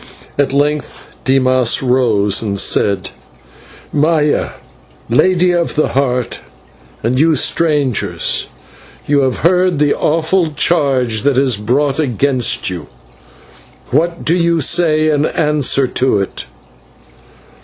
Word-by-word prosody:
At 145 -2 0
length 145 +1 -2 0.2
Dimas 130 -2 +2
rose, 115 -6 +1
and 100 -3 -3
said: 100 -1 0 0.8
"Maya, 150 0 +1 0.6
Lady 180 +7 +3
of 175 -1 -1
the 155 - +1
Heart, 125 -3 -1 0.6
and 125 +3 0
you 160 +1 +3
strangers, 145 -4 0 0.6
you 145 0 +2
have 130 -2 0
heard 180 -1 +2
the 145 0 +2
awful 165 +3 0
charge 135 -9 +1
that 140 -1 +1
is 130 -3 +2
brought 135 +7 -1
against 130 -2 0
you. 90 -4 -5 1.0
What 170 +5 -1
do 165 - +2
you 170 -1 +1
say 155 0 +2
in 150 0 +1
answer 150 -3 +1
to 130 -4 +1
it?" 100 - -5
140 Hz, 110 wpm, -15 LUFS, 125-160 Hz, 1.0 s, Lady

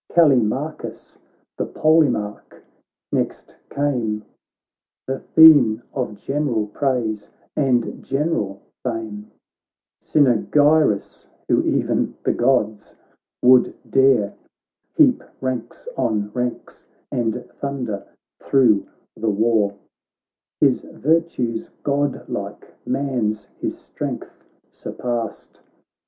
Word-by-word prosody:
Callimachus 140 -2 +1 0.4
the - - -1
Polemarch 155 -10 +1 0.5
next - - -3
came, 120 -7 -1 0.8
The 135 0 -3
theme 135 -9 +6
of 125 -6 -3
general 130 -1 -1
praise 110 -3 -2 0.3
and 130 -5 0
general 135 -10 -2 0.2
fame. 110 -4 -5 0.7
Cynaegirus, 145 -2 +2 0.2
who - - +3
e'en - - 0
the - - +2
Gods 110 -4 0 0.5
would 125 0 +5
dare. 130 -7 +3 0.6
Heap - - +4 0.2
ranks 130 - -4
on 105 -1 -1
ranks, 125 -1 -4 0.2
and 115 -2 0 0.2
thunder 125 -8 -4 0.3
thro' 120 -7 +3 0.3
the 115 - -1
war; 105 -1 +2 0.8
His - - +3
virtues 150 -7 -1
godlike; 145 0 -3
man's 120 -6 -1
his - - -3
strength - - -7 0.3
surpassed. 120 -3 -5
125 Hz, 85 wpm, -21 LUFS, 110-140 Hz, 0.8 s, theme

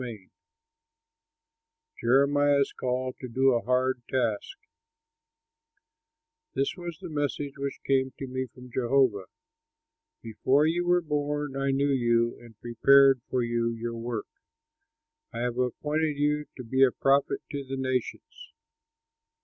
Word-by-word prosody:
Taylor] 120 -4 -6 1.8
JEREMIAH'S 140 +3 +3
CALL 130 0 -2
TO 130 - -6
DO 130 +2 +3
A 120 - +1
HARD 125 0 0
TASK 125 - -1 2.0
This 135 - 0
was 175 -3 -7
the 185 - -7
message 145 -2 -3
which 140 0 -4
came 130 -1 +1
to 135 - -5
me 130 0 -4
from 125 0 -14
Jehovah: 120 -5 +2 1.0
"Before 130 +6 +2
you 175 +2 0
were 175 0 +3
born 145 -2 -2
I 135 0 -1
knew 140 +1 +1
you 120 -2 +2
and 115 -3 -16
prepared 135 +3 +5
you 120 - -38
for 125 -1 0
your 115 0 -2
work. 115 -2 -4 1.1
I 115 - -5
have 125 0 -2
appointed 150 +4 -1
you 150 +1 +1
to 125 - -7
be 130 +3 -1
a 135 - +6
prophet 135 +2 +1
to 140 -2 -4
the 135 0 -5
nations." 130 - -4
130 Hz, 130 wpm, -27 LUFS, 120-145 Hz, 2.0 s, a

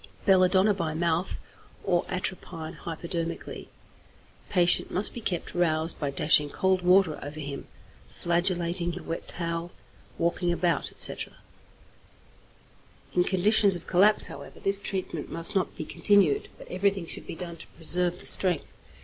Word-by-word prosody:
Belladonna 190 +2 +4
by 165 -5 -3
mouth, 170 +2 -1 0.5
or 175 -3 +1
atropine 175 -3 -5
hypodermically. 170 0 -6 0.8
Patient 175 -2 +3
must 195 +3 +1
be 240 - -7
kept 180 -5 -4
roused 160 -2 0
by 145 - -2
dashing 150 +1 +3
cold 190 +4 0
water 180 -3 +3
over 145 +2 -8
him, 140 -2 -7 0.4
flagellating 175 0 -1
with 170 - -5
a - - -9
wet 165 - -6
towel, 170 0 -4 0.5
walking 175 +1 0
about, 170 -3 0
etc. - - +1 1.8
In 180 - +3
conditions 195 +2 +4
of 170 - -8
collapse, 205 +4 +3
however, - - -10
this 195 0 +3
treatment 185 -6 -5
must 165 +5 +2
not 190 -3 -1
be 155 - -6
continued, 195 -7 +2
but - - -13
everything 195 0 -1
should - - -6
be - - -6
done 170 -1 -8
to - - -12
preserve 175 +2 +2
the - - -9
strength. 180 -5 +4
175 Hz, 140 wpm, -26 LUFS, 165-190 Hz, 1.8 s, Belladonna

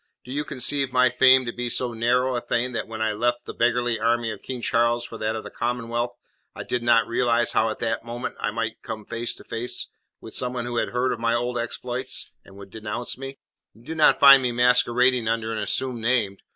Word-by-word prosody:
Do 125 - -9
you 145 +2 -1
conceive 135 0 0
my 125 0 +4
fame 130 +1 +5
to 120 - -2
be 120 +1 -3
so 120 0 -2
narrow 125 +3 +1
a 120 - -1
thing 120 +1 -1
that 115 -3 -3
when 110 0 -4
I 110 - +1
left 120 +3 -1
the - - -7
beggarly 120 -1 +1
army 115 0 +1
of 105 - -8
King 130 -1 -5
Charles 120 0 +1
for 115 -1 -9
that 110 +1 -1
of 110 - -5
the - - -9
Commonwealth, 120 0 -2 0.4
I - - -6
did 125 - -2
not 115 -2 +4
realize 120 0 +1
how 110 +1 +2
at 110 - -5
any 115 0 0
moment 120 +2 -5
I - - -1
might 115 0 -4
come 110 -1 -7
face 115 0 -3
to - - -13
face 115 +2 -4 0.3
with - - -11
someone 125 -1 -2
who 120 -1 -4
had - - 0
heard 125 +1 0
of - - -6
my 115 0 +1
old 120 0 -1
exploits, 125 +2 -5
and 95 - -17
would 100 -1 -12
denounce 110 +3 -5
me? 135 +1 -8 0.4
You 115 - -19
do 160 - -6
not 160 -1 +4
find 140 -1 +9
me 125 -1 0
masquerading 125 0 +3
under 115 0 -1
an 110 - -3
assumed 120 +4 -1
name. 110 -4 +1
120 Hz, 230 wpm, -24 LUFS, 115-125 Hz, 0.4 s, find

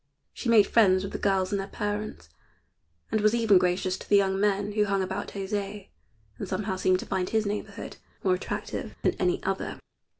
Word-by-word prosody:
She 245 - -4
made 220 -3 +7
friends 190 -5 +4
with 195 - -5
the - - -4
girls 190 -2 +1
and 200 - 0
their 195 - -6
parents, 205 +1 -4 0.8
and 220 - +1
was 215 +2 +4
even 220 -5 +5
gracious 185 +1 0
to - - -12
the 205 - +5
young 190 -1 +2
men 205 0 +1
who 210 0 +2
hung 195 -1 +1
about 190 +2 -3
José, 200 0 -4 0.5
and - - -4
somehow 195 -2 -2
seemed 185 0 +2
to - - -7
find 180 -1 -1
his 220 -1 +1
neighborhood 205 +1 -5 0.3
more 185 - +3
attractive 185 - -4
than - - +3
any 360 +1 +1
other. - - -2
200 Hz, 195 wpm, -27 LUFS, 190-210 Hz, 0.8 s, made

